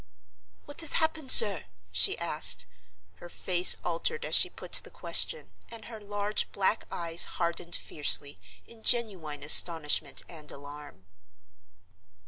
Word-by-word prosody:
"What 290 +2 -11
has 325 - -2
happened, 315 -4 -1
sir?" 205 -4 +3 0.3
she 90 0 0
asked. 150 - +3 0.5
Her 175 - -14
face 180 0 +3
altered 320 - -4
as - - -7
she - - +4
put - - -14
the - - +1
question, 480 - -3 0.2
and 230 -2 -12
her 225 -2 -12
large 205 +1 -5
black 200 +3 -3
eyes 170 0 -1
hardened 170 0 -4
fiercely, 145 -6 +2 0.3
in 230 -1 -18
genuine 185 -13 -2
astonishment 155 0 +4
and 155 -3 -13
alarm. 145 -8 -13
175 Hz, 125 wpm, -26 LUFS, 150-220 Hz, 0.5 s, she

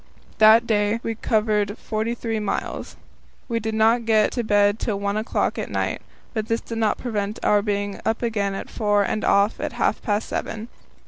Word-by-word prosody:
That 220 +2 +7
day 210 0 +1
we 225 - -2
covered 215 -1 0
forty 220 +2 -2
three 225 -2 -2
miles. 210 - -3 0.5
We 230 -2 -1
did 220 0 -3
not 225 +2 +3
get 220 -1 +3
to 240 - -2
bed 205 0 +3
till 205 -4 -2
one 200 0 -1
o'clock 215 +1 -1
at - - -4
night, - - -2 0.3
but 220 -2 -2
this 230 0 0
did 230 -1 -5
not 220 -2 +1
prevent 210 -3 -3
our 205 -1 +4
being 205 -1 -2
up 225 +2 -1
again 205 -4 -1
at - - -5
four 205 -2 +2
and 215 +2 -2
off 200 +2 +3
at - - -3
half - - 0
past 210 -1 -1
seven. 220 +2 -4
215 Hz, 190 wpm, -23 LUFS, 205-225 Hz, 0.5 s, That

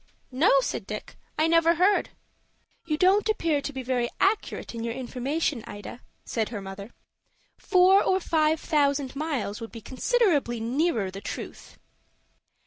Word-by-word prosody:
"No," 295 - +3
said - - -4
Dick. - - -7 0.2
"I 310 - +3
never 330 +1 +4
heard." 375 +4 +3 0.8
"You 305 -2 -1
don't 390 +5 +3
appear 330 -9 +1
to 290 - -4
be 265 -2 -6
very 245 -1 0
accurate 405 - 0
in 230 -1 -5
your 230 0 -3
information, 260 +1 -2
Ida," 205 +4 -9 0.2
said 220 -2 -2
her 225 - -5
mother. 195 +1 -8 0.7
"Four 380 0 +5
or 375 - +2
five 315 -3 +1
thousand 280 -4 0
miles 275 -8 -3
would 225 - -7
be 230 - -8
considerably 285 - +1
nearer 235 - 0
the 195 +1 -8
truth." - - -8
285 Hz, 145 wpm, -26 LUFS, 235-335 Hz, 0.8 s, Four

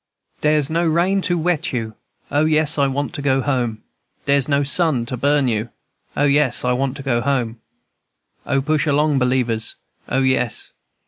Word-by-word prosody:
"Dere's 150 -2 +2
no 165 +3 0
rain 175 +4 +2
to 175 -1 0
wet 170 -1 -1
you, 115 -3 -3 0.4
O, 145 +2 +2
yes, 155 -1 +2
I 140 - +3
want 140 +4 -3
to 150 - -4
go 135 -1 +2
home. 125 -5 -2 0.4
Dere's 140 -2 +3
no 140 0 +2
sun 140 -4 +1
to 125 - -4
burn 140 +2 +2
you, 110 0 -1 0.5
O, - - +2
yes, 140 -4 +2
I 125 - +2
want 135 +1 -1
to 135 - -8
go 120 -4 0
home; 120 -4 -1 0.9
O, 135 0 +1
push 155 +1 0
along, 145 -1 +2
believers, 125 -3 0 0.3
O, 130 - +1
yes, 130 -3 0
&c. - - -34
140 Hz, 180 wpm, -20 LUFS, 125-150 Hz, 0.9 s, I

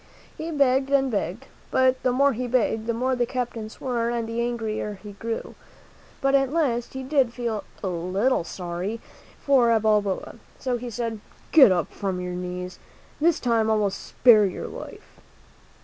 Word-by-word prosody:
He 320 - -5
begged 275 -3 +2
and 270 -2 +2
begged, 205 +3 -2 0.2
but 260 0 +3
the 255 - +2
more 280 +3 +3
he 250 +2 -3
begged, 225 -2 0
the 235 - +1
more 255 +2 0
the 245 -1 0
captain 240 -3 -3
swore 235 0 -2
and 235 -1 -2
the 230 +1 -2
angrier 220 -3 -2
he 210 - -8
grew. 225 +3 -5 0.7
But 275 0 +2
at 270 -1 +3
last, 260 -7 0
he 265 - -4
did 265 -3 +2
feel 230 -4 -2 0.2
a - - -1
little 185 +6 0
sorry 180 +5 -4 0.5
for 265 -4 +5
Balboa; 210 -3 0 0.2
so 255 -2 -1
he 245 +1 -6
said, 230 -1 -3 0.3
"Get 270 -10 +8
up 175 -3 0
from 190 -2 -3
your 180 0 -4
knees. 180 0 -5 0.4
This 330 +2 +3
time 230 -3 +1
I 220 - +3
will 205 -2 +1
spare 215 +1 +4
your 185 - -5
life." - - -11
235 Hz, 170 wpm, -25 LUFS, 205-260 Hz, 0.7 s, Get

